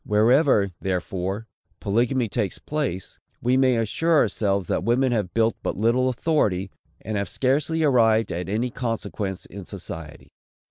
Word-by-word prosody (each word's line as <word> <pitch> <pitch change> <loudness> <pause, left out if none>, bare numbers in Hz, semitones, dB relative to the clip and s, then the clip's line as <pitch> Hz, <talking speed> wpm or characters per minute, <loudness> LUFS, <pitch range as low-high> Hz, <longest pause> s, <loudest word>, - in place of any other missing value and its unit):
Wherever, 110 - +3
therefore, 95 +3 -3 0.3
polygamy 120 +4 +1
takes 105 -3 -2
place, 140 - -4 0.2
we 125 +2 +1
may 130 -2 +3
assure 160 +9 +1
ourselves 100 -8 +1
that - - -1
women 125 +4 +2
have 105 -6 -1
but 115 0 0
little 120 +5 +2
authority, 110 - 0 0.3
and 110 -1 -3
have 100 - -2
scarcely 150 +5 +1
arrived 115 -6 +3
at 90 +2 -4
any 115 +5 -1
consequence 115 -6 -4
in 100 +1 -9
society. 85 -5 -8
115 Hz, 135 wpm, -24 LUFS, 100-130 Hz, 0.3 s, Wherever